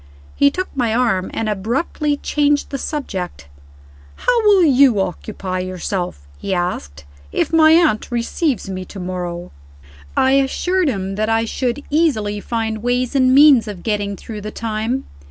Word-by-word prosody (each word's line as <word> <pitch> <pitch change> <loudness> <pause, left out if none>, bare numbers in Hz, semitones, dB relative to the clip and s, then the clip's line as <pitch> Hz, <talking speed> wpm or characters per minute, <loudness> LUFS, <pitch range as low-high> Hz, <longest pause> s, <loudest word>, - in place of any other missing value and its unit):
He 280 - +5
took 370 +4 -5
my 235 -4 0
arm 225 -7 +1
and 225 - -3
abruptly 250 - -1
changed 290 0 0
the 275 - -3
subject. 190 - -5 0.7
"How - - +1
will 400 -3 +6
you 270 -7 +5
occupy 190 0 -3
yourself," 180 - -4
he 195 - -2
asked, 75 - -4 0.3
"if - - -1
my 315 -1 +6
aunt 320 -10 +3
receives 240 - -1
me 185 -1 -5
to 195 - -10
morrow?" 180 -1 -5 0.7
I 265 - +4
assured 320 +7 +1
him 195 -6 -2
that 215 +1 0
I 225 0 +2
should 250 +4 -2
easily 220 -10 +1
find 220 0 -3
ways 245 +2 0
and 260 -2 +3
means 280 -5 +7
of 200 -4 -7
getting 205 -2 -1
through 215 +1 -8
the 210 - -5
time. 225 +4 -3
225 Hz, 155 wpm, -19 LUFS, 195-280 Hz, 0.7 s, means